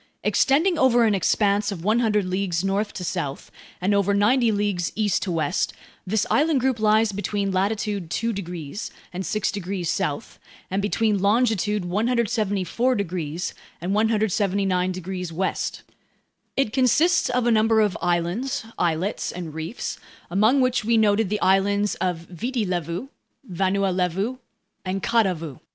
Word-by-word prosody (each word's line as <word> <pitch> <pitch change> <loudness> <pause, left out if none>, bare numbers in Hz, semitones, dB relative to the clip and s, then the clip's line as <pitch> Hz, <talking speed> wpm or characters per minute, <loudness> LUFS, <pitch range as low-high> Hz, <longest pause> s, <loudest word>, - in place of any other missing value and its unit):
Extending 315 +5 +3
over 245 -2 +5
an 220 -2 +3
expanse 200 +2 +2
of 175 -4 -6
100 215 -1 +2
leagues 185 -2 -1
north 200 +2 0
to 185 - -6
south, 165 -6 -4 0.3
and 190 +3 +1
over 200 0 +2
90 230 +3 +3
leagues 205 -4 -1
east 210 -3 +1
to 190 - -2
west, 155 -4 0 0.3
this 210 +2 +1
island 300 -1 +3
group 255 -2 0
lies 215 0 +3
between 200 0 -2
latitude 200 -1 -1
2 230 +8 -1
degrees 175 -1 -6 0.2
and 185 +2 -3
6 215 +2 -1
degrees 185 -3 -3
south, 145 - -3 0.3
and 195 +1 0
between 210 0 +1
longitude 210 -1 +1
174 220 +2 0
degrees 175 -4 -3 0.3
and 180 +3 -2
179 200 -4 +1
degrees 180 -1 -5
west. 185 +4 -2 0.7
It 270 -6 +1
consists 295 +7 +3
of 250 -1 +1
a 240 - +3
number 220 0 +4
of 210 -3 +2
islands, 175 +9 -1
islets, 175 +4 0
and 170 -3 -7
reefs, 160 +8 -5 0.3
among 220 +9 +4
which 255 -2 +1
we 230 +1 +2
noted 215 -1 +3
the 210 0 -1
islands 200 +2 +2
of 180 -2 0
Viti 220 +8 -3
Levu, 175 - -3 0.4
Vanua 195 +1 0
Levu, 190 +7 -1 0.5
and 190 +1 -3
Kadavu. 180 - 0
200 Hz, 140 wpm, -24 LUFS, 180-225 Hz, 0.7 s, over